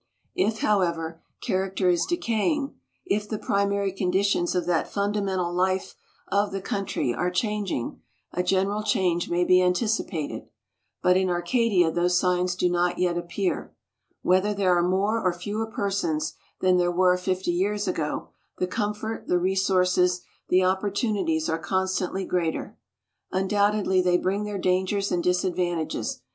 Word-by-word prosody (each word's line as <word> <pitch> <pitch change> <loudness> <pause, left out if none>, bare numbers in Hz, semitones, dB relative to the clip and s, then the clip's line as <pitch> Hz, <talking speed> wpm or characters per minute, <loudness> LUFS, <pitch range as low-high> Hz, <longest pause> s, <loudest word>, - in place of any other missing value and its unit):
If, 220 +2 0
however, 170 -5 0 0.2
character 190 0 0
is 175 -1 +2
decaying, 285 -1 0 0.3
if 210 - -1
the 215 - -2
primary 200 -1 0
conditions 185 -1 +1
of 180 - 0
that 175 -2 0
fundamental 200 -3 -1
life 185 +1 0 0.4
of 200 +1 +1
the 195 - -3
country 195 -10 -2
are 180 +8 0
changing, 200 - -2 0.3
a 180 - 0
general 195 +3 +1
change 185 -5 +1
may 175 +1 +2
be 185 +1 +5
anticipated. 180 -4 -1 0.6
But 180 0 +5
in 190 -1 +1
Arcadia 180 0 +2
those 175 +1 +2
signs 180 0 +1
do 180 - +1
not 175 0 +1
yet 180 -1 +1
appear. 175 +2 -3 0.5
Whether 190 +3 +2
there 185 -3 +3
are 175 - +3
more 195 +5 +1
or 185 - +3
fewer 205 +5 -3
persons 195 -7 -1 0.3
than 185 -1 +4
there 175 0 +2
were 180 +1 +4
fifty 185 0 -1
years 205 +4 0
ago, 160 -4 -2 0.3
the 180 - 0
comfort, 210 +3 -3
the 180 - +3
resources, 180 -1 +2 0.3
the 185 +1 +4
opportunities 190 -3 0
are 165 -1 -1
constantly 190 +2 -1
greater. 170 -3 -2 0.6
Undoubtedly 200 0 +2
they 180 -1 +3
bring 195 +3 -1
their 210 -1 -3
dangers 190 +2 0
and 175 -1 0
disadvantages. 180 -2 -1
185 Hz, 140 wpm, -25 LUFS, 180-200 Hz, 0.6 s, be